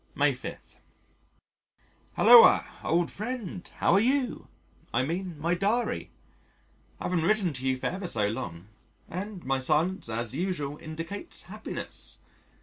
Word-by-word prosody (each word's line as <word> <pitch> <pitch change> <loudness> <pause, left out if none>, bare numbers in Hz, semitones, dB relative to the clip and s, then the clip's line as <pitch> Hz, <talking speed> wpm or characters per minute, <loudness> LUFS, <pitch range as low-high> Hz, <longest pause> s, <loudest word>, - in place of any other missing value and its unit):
May - - +3
5. - - -7 1.6
Hulloa, 475 0 +8 0.2
old 170 +1 +1
friend: 215 -5 -5
how - - +2
are 195 - +6
you? 255 +3 +1 0.4
I 120 - +1
mean 175 +2 -3
my 165 +3 +1
Diary. 205 +7 0 0.9
I - - -7
haven't 175 -3 +1
written 190 -3 +2
to 130 0 -1
you 130 0 +1
for - - -7
ever 185 0 -2
so 105 -9 +2
long, 85 -5 -5 0.4
and 190 +1 -6
my 135 0 +1
silence 155 - +1
as 115 +1 -2
usual 150 -3 -2
indicates 165 - -6
happiness. - - -7
175 Hz, 135 wpm, -28 LUFS, 140-200 Hz, 1.6 s, Hulloa